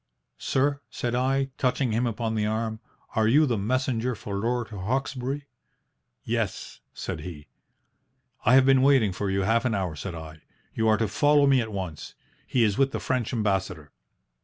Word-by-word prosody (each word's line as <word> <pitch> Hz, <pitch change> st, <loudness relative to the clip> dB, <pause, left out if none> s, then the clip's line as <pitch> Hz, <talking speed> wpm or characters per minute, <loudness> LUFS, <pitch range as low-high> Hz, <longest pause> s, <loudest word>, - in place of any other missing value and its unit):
"'Sir," 140 Hz, +1 st, 0 dB
said 120 Hz, -1 st, -3 dB
I, 135 Hz, +2 st, +1 dB
touching 130 Hz, -1 st, +1 dB
him 120 Hz, +3 st, +1 dB
upon 115 Hz, 0 st, -2 dB
the 105 Hz, -1 st, 0 dB
arm, 110 Hz, 0 st, -2 dB, 0.4 s
'are 110 Hz, -1 st, +3 dB
you 145 Hz, +7 st, +5 dB
the 125 Hz, -5 st, 0 dB
messenger 125 Hz, +3 st, 0 dB
for 100 Hz, -1 st, -6 dB
Lord 120 Hz, +3 st, -1 dB
Hawkesbury?' 130 Hz, +6 st, -3 dB, 0.8 s
"'Yes,' -, -, -3 dB
said -, -, -5 dB
he. 80 Hz, -5 st, -8 dB, 1.0 s
"'I 120 Hz, -, +5 dB
have 135 Hz, -1 st, +6 dB
been 135 Hz, -1 st, +5 dB
waiting 130 Hz, -7 st, +4 dB
for 95 Hz, +2 st, -3 dB
you 95 Hz, 0 st, 0 dB
half 115 Hz, +4 st, +2 dB
an 120 Hz, -4 st, 0 dB
hour,' 90 Hz, -5 st, -2 dB
said 85 Hz, +3 st, -6 dB
I. 80 Hz, -1 st, -9 dB, 0.3 s
'You 110 Hz, -, 0 dB
are 110 Hz, -1 st, +4 dB
to 110 Hz, -, 0 dB
follow 145 Hz, +7 st, +4 dB
me 135 Hz, -2 st, +4 dB
at 110 Hz, -1 st, -5 dB
once. 95 Hz, -6 st, -6 dB, 0.3 s
He 125 Hz, -, +2 dB
is 105 Hz, 0 st, +1 dB
with 135 Hz, 0 st, +2 dB
the -, -, -2 dB
French 125 Hz, -3 st, -1 dB
Ambassador.' 95 Hz, -, -1 dB
115 Hz, 175 wpm, -26 LUFS, 100-130 Hz, 1.0 s, have